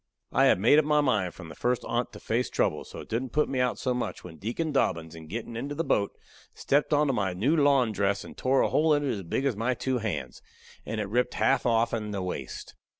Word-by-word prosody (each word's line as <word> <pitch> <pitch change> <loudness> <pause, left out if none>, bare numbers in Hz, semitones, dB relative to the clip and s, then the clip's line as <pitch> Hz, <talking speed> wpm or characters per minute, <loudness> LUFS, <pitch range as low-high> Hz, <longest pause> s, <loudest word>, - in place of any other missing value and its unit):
I - - +4
had - - +5
made 120 +9 +6
up 155 - +1
my 150 0 +3
mind 105 - +1
from 85 -3 -10
the - - -8
first 125 +6 -1
on't 120 +1 -1
to - - -9
face 120 +3 -1
trouble, - - 0
so - - -9
it - - -12
didn't 120 +3 -3
put 150 0 +2
me 135 - -2
out 125 -1 +1
so 125 - -1
much 125 - -4
when 85 -3 -10
Deacon 120 - -3
Dobbins, 85 - 0
in 80 -1 -10
gettin' 115 +6 -5
into 140 +5 -4
the 165 - -1
boat, 100 -10 0 0.4
stepped 145 +3 +1
onto 145 -2 +3
my 100 -6 0
new 120 - +1
lawn 140 -6 +4
dress 100 -1 0
and - - -11
tore 130 +1 +2
a - - +1
hole 155 0 +3
in 145 - 0
it - - +1
as 100 - -4
big 95 +10 -2
as 135 -5 +1
my 120 +4 0
two 130 +1 -1
hands, 110 -3 -4 0.5
and 110 - -3
ripped 125 +2 +1
it - - -6
half 135 -2 +2
offen 115 -2 +1
the 100 -2 -3
waist. 90 - -6
120 Hz, 250 wpm, -28 LUFS, 100-135 Hz, 0.5 s, made